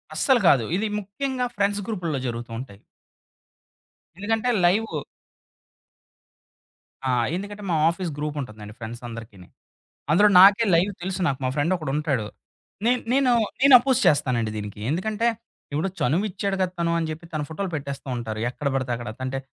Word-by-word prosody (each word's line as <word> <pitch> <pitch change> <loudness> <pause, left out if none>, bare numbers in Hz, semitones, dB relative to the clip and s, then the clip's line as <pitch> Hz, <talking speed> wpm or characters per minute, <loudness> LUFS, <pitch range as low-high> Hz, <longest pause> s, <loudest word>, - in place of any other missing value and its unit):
అస్సలు 265 -3 +3
కాదు. 125 -5 +5
ఇది 215 +2 -1
ముఖ్యంగా 250 +6 -3
ఫ్రెండ్స్ 205 0 +1
గ్రూపుల్లో 170 -10 -2
జరుగుతూ 120 0 -5
ఉంటాయి. 100 -6 -9 1.4
ఎందుకంటే 225 +4 0 0.2
లైవు. 210 +6 +1 2.1
ఆ! - - +3 0.2
ఎందుకంటే 205 +2 -6
మా 170 - +2
ఆఫీస్ 170 -1 -3
గ్రూప్ 150 0 -3
ఉంటుందండి 110 -3 -9
ఫ్రెండ్స్ 115 +1 -7
అందరికినీ. 110 -6 -10 0.6
అందులో 205 +6 +6
నాకే 200 +4 +7
లైవ్ 185 +5 +2
తెలుసు 190 +1 -3
నాకు. 135 -4 -1
మా 130 - +1
ఫ్రెండ్ 155 +5 +1
ఒకడుంటాడు. 150 -6 -1 0.6
నేన్ 250 +1 +3
నేను, 265 -2 +3 0.3
నేను 275 -1 +7
అపోజ్ 260 0 +1
చేస్తానండి 125 -8 +2
దీనికి. 105 0 -6
ఎందుకంటే, 215 +8 0 0.4
ఇప్పుడు 155 +6 -1
చనువు 165 +11 +1
ఇచ్చాడు 195 +1 -2
గదా! 185 - 0
తను 170 0 +1
అని 165 - -1
చెప్పి 160 +2 -8
తన 155 - -1
ఫోటోలు 190 +4 -3
పెట్టేస్తూ 140 -2 -6
ఉంటారు. 110 -2 -4
ఎక్కడ 140 +3 -4
బడితే 130 -2 -1
అక్కడ. 120 -2 -6
తంటే 130 +1 -3
165 Hz, 145 wpm, -24 LUFS, 130-205 Hz, 2.1 s, నాకే